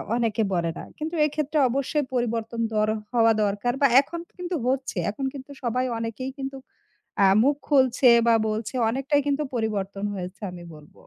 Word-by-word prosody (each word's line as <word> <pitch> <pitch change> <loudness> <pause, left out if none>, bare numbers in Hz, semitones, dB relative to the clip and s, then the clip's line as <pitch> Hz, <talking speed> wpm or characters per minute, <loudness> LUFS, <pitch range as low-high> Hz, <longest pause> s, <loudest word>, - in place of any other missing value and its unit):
অনেকে 225 -2 +1
বলে 170 -2 0
না। - - -6
কিন্তু 320 +3 -4
এক্ষেত্রে 300 0 -1
অবশ্যই 275 +3 -1
পরিবর্তন 230 -1 -1
দর 215 0 +2 0.3
হওয়া 230 -2 +5
দরকার 205 +5 -1
বা 280 - +7
এখন 340 +4 -7 0.2
কিন্তু 360 0 -3
হচ্ছে। 260 -4 -1
এখন 270 +6 -4
কিন্তু 275 0 -9
সবাই 250 +2 0
অনেকেই 230 +4 -4
কিন্তু 270 0 -5 0.7
আ - - +7 0.2
মুখ 280 +2 +3
খুলছে 260 -3 +4 0.2
বা 230 - +6
বলছে। 215 +4 -3 0.2
অনেকটাই 275 +3 +1
কিন্তু 285 +1 +1
পরিবর্তন 205 -3 -2
হয়েছে 185 +2 -7
আমি 175 -1 -10
বলব। 150 0 -16
245 Hz, 165 wpm, -25 LUFS, 215-275 Hz, 0.7 s, বা